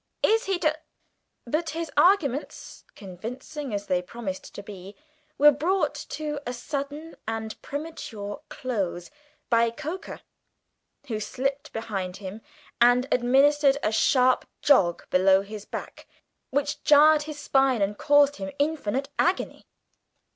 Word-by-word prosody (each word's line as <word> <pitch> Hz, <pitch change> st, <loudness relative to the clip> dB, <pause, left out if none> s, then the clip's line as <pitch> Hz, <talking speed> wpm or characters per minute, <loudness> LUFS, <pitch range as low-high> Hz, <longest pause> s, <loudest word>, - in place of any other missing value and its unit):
Is 450 Hz, +1 st, +3 dB
he 390 Hz, -1 st, 0 dB
to 310 Hz, -3 st, +1 dB, 0.4 s
" -, -, -51 dB
But 325 Hz, +1 st, -1 dB
his 330 Hz, -3 st, -4 dB
arguments, 295 Hz, -4 st, +1 dB
convincing 230 Hz, -, -7 dB
as 205 Hz, -1 st, -3 dB
they 180 Hz, -2 st, +1 dB
promised 190 Hz, 0 st, -7 dB
to 200 Hz, -, -7 dB
be, 200 Hz, -1 st, -10 dB, 0.4 s
were 295 Hz, +1 st, +8 dB
brought 355 Hz, +7 st, 0 dB, 0.2 s
to 300 Hz, -1 st, -4 dB
a 245 Hz, -, -4 dB
sudden 285 Hz, +5 st, -5 dB
and 220 Hz, -1 st, -4 dB
premature 255 Hz, -9 st, -6 dB
close 195 Hz, -9 st, -3 dB, 0.4 s
by 230 Hz, 0 st, +4 dB
Coker, 320 Hz, -, -7 dB, 0.8 s
who 225 Hz, -5 st, -3 dB
slipped 275 Hz, +6 st, -3 dB
behind 195 Hz, -5 st, -4 dB
him 200 Hz, +2 st, -8 dB, 0.4 s
and 245 Hz, +2 st, +5 dB
administered 275 Hz, +3 st, +4 dB
a 215 Hz, -, +1 dB
sharp 255 Hz, +3 st, +3 dB, 0.2 s
jog 190 Hz, -12 st, +3 dB
below 190 Hz, +1 st, +5 dB
his 210 Hz, 0 st, -9 dB
back, -, -, -8 dB, 0.4 s
which 285 Hz, +2 st, -1 dB
jarred 300 Hz, +1 st, +6 dB
his 300 Hz, -, -6 dB
spine 270 Hz, -5 st, +2 dB
and 200 Hz, +1 st, -1 dB
caused 290 Hz, -1 st, +4 dB
him 290 Hz, -, -5 dB
infinite 285 Hz, -3 st, -1 dB
agony. 360 Hz, +2 st, 0 dB
265 Hz, 130 wpm, -26 LUFS, 210-295 Hz, 0.8 s, were